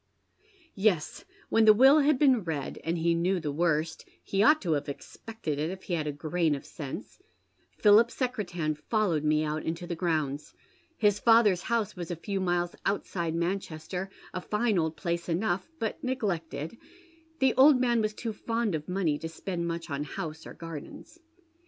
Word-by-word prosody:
Yes, 195 - 0 0.2
when 225 0 +4
the 215 -1 +8
will 270 +6 +7
had 295 -1 +3
been 260 -6 +4
read, 155 -5 -4
and 165 +1 -1
he 170 +1 +2
knew 180 +3 +1
the 150 -3 -3
worst 160 0 0
— - - -37
he 195 - -2
OTight 300 +10 +5
to 175 - -1
have 145 -1 0
expected 155 +1 -6
it 155 +2 -1
if 190 +1 -7
he 180 - -4
had 155 -3 -1
a - - 0
grain 155 +2 0
of 140 - -8
sense, 155 - -8 0.3
— - - -33
PliiJip 215 +2 +7
Secretan 190 - -2
followed 165 0 0
me 155 0 +2
out 155 0 -2
into 165 +2 -4
the 175 -1 -4
grounds. 155 -4 -2 0.4
His 210 -2 +3
father's 225 -6 +5
house 230 -2 -1
was 175 -2 -6
a 175 - -2
few 195 +4 -3
miles 175 -1 0
outside 170 -4 -1
Manchester, 180 +1 -3 0.2
a 185 - -3
fine 210 0 +1
old 160 -1 -1
place 170 0 -3
enough, 180 - -1
but 225 -6 -3
neglected, 195 - -3 0.3
— 325 -1 -31
the 265 -1 +4
old 265 0 +7
man 240 -2 +2
was 215 0 -1
too 230 -2 -4
fond 230 -1 -1
of 155 0 -4
money 175 -6 0
to 165 - -5
spend 170 +1 -4
mucii 170 -1 -5
on 140 +1 -2
house 155 +2 -6
or - - -10
gardens. 165 - -9
175 Hz, 185 wpm, -29 LUFS, 160-220 Hz, 0.4 s, the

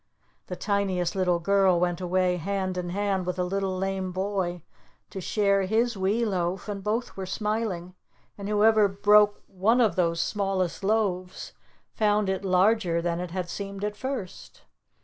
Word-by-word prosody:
The 180 - -5
Tiniest 190 -3 -1
Little 180 -2 +2
Girl 190 0 +3
went 175 0 0
away 180 0 +1
hand 190 +1 -2
in 180 -1 -3
hand 195 -1 -1
with 180 - -1
the 180 - -1
Little 190 0 -2
Lame 190 0 -2
Boy 185 -3 -2 0.5
to 195 - -6
share 200 +1 +2
his 230 +3 +1
wee 200 +5 +1
loaf, 185 -2 -2
and 200 -2 -5
both 220 +4 -2
were 190 -1 -5
smiling, 210 -4 -2 0.4
and 200 0 -6
whoever 210 0 +4
broke 205 +1 +4
one 210 +6 +1
of 225 -4 +3
those 170 -3 +1
smallest 195 -2 -1
loaves 195 -3 -1 0.4
found 210 -2 +1
it 190 0 -2
larger 185 -1 +2
than 170 0 -1
it 180 0 -4
had 180 0 -4
seemed 200 +2 -6
at 210 0 -2
first. 260 -5 -6
195 Hz, 160 wpm, -26 LUFS, 180-205 Hz, 0.5 s, whoever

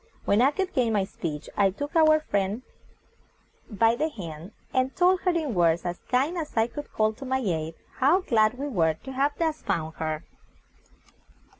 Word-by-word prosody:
When 205 +3 +3
I 265 - +6
could 370 +6 -3
gain 235 -3 +1
my 205 -2 +2
speech 160 -5 -5
I 200 -1 +4
took 285 - -6
our 310 -1 +6
new - - +2
friend 205 -2 -1 1.1
by 225 +1 +3
the 310 +6 0
hand, 170 - -8 0.2
and 260 0 +1
told 365 +1 +4
her 365 - +1
in 320 -7 -1
words 170 -2 +2
as 175 0 -3
kind 280 +8 +1
as 305 -6 -6
I 225 - +5
could 290 +5 -8
call 215 0 +1
to 220 - -11
my 265 0 0
aid, 165 -9 -2 0.2
how, 290 +9 +4
glad 220 -7 +2
we 280 +2 -3
were 165 - +1
to 265 - -10
have 275 +2 0
thus 320 -2 -1
found 160 0 -2
her. 155 0 -3
235 Hz, 190 wpm, -26 LUFS, 180-290 Hz, 1.1 s, I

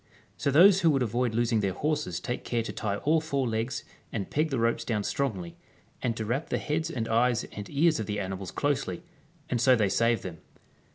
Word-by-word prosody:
So - - -1
those 185 +7 +7
who 165 - +5
would 135 -4 +2
avoid 120 0 0
losing 115 -1 +2
their 100 -2 0
horses 150 - -1
take 120 - -4
care 120 -1 -1
to - - -5
tie 100 -3 -2
all 155 +9 +2
four 140 -5 -1
legs 115 +2 -2 0.3
and 100 -4 -4
peg 155 +2 +1
the 135 - -1
ropes 115 0 +1
down 110 -3 -1
strongly, 95 -10 -2 0.4
and 115 -2 -1
to 110 - -3
wrap 130 +8 -2
the - - 0
heads 160 +2 -2
and 120 -8 -3
eyes 120 +1 +2
and 105 -1 -7
ears 160 +1 +3
of 110 - -3
the 105 -1 -2
animals 95 -1 -4
closely, 145 +3 -1 0.4
and 120 -5 -1
so 130 0 +6
they 105 -4 +2
save 115 +1 +2
them. 85 -4 -7
120 Hz, 215 wpm, -28 LUFS, 110-140 Hz, 0.4 s, those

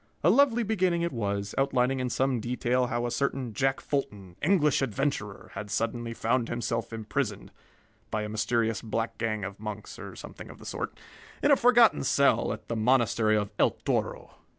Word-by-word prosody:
A 170 - +6
lovely 240 -1 +4
beginning 185 -5 +1
it 170 - 0
was, 100 -3 -2
outlining 135 -1 +2
in 125 -1 -1
some 130 0 +1
detail 125 +2 0
how 120 -1 -1
a 120 - -2
certain 130 -1 -1
Jack 135 +3 +1
Fulton, 100 -10 -4
English 150 -5 +3
adventurer, 130 -5 -2
had 100 +1 -6
suddenly 115 +2 -2
found 115 +1 0
himself 120 -1 -2
imprisoned 110 -2 -3 0.6
(by 110 - -1
a 105 - -4
mysterious 110 +1 0
black 115 +1 -3
gang 110 -2 -1
of 100 0 -6
monks, 105 -1 -7
or - - -8
something - - -10
of - - -11
the - - -14
sort) - - -4 0.5
in 290 - +5
a - - +8
forgotten 240 -2 +5
cell 140 +1 +3
at - - -7
the 115 - -2
monastery 115 -2 +3
of 105 -1 -2
El - - +5 0.2
Toro. - - -1
120 Hz, 175 wpm, -28 LUFS, 110-140 Hz, 0.6 s, a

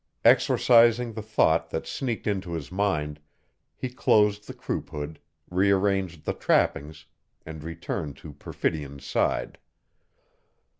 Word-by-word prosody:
Exorcising 115 0 +5
the 110 - -5
thought 100 -6 +2
that - - -4
sneaked 120 -5 -3
into 95 -4 -2
his 80 -2 -5
mind, 75 -7 -1 0.6
he 130 - -4
closed 105 -4 +2
the - - -7
croup - - -4
hood, 75 +1 -6 0.3
rearranged 95 -3 +1
the - - 0
trappings, 75 0 0 0.4
and 80 -1 -8
returned 80 -3 -5
to 75 - -11
Perfidion's 70 -1 -4
side. - - -1
90 Hz, 115 wpm, -26 LUFS, 75-105 Hz, 0.6 s, Exorcising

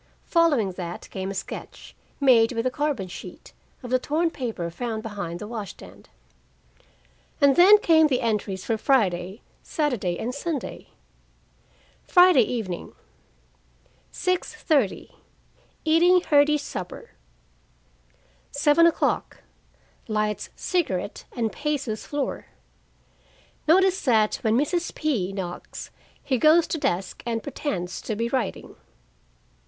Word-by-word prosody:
Following 295 - +2
that 175 -1 -7
came 190 0 -4
a 195 - -5
sketch, 190 - -8 0.2
made 250 -4 +5
with 230 0 -2
a 255 - +1
carbon 285 -8 -2
sheet, 175 - -10 0.3
of 245 - -7
the 255 - +3
torn 325 +5 0
paper 220 - -4
found 220 +3 -4
behind 200 -6 -5
the 210 - -7
wash 215 -3 -5
stand: - - -15 1.3
And 280 -2 +5
then 385 +4 +8
came 320 -5 +4
the 260 -3 0
entries 210 -5 -2
for 225 - 0
Friday, 195 -6 +1 0.2
Saturday 245 - -1
and 245 +3 -3
Sunday. 285 0 -5 1.2
Friday 355 -6 +6
evening: 215 -6 -3 1.2
6:30 315 - -1 0.7
Eating 345 +3 +5
hearty 295 -1 +4
supper. 185 -10 -7 1.4
7:00 300 +4 +3 0.9
Lights 215 -1 -1
cigarette 250 - -2
and 225 -3 -1
paces 285 -7 -3
floor. 290 -2 -3 1.2
Notice 375 +3 +4
that 220 -5 +3
when 225 -2 +1
Mrs. 340 +5 -1
P. 235 - -1
knocks, 185 -3 -7 0.3
he 260 -3 0
goes 320 +4 +5
to 320 - -3
desk 180 -6 -2
and 230 -1 -3
pretends 190 - -4
to 220 - -3
be 230 +2 -2
writing. 260 +1 -3
250 Hz, 115 wpm, -25 LUFS, 205-300 Hz, 1.4 s, then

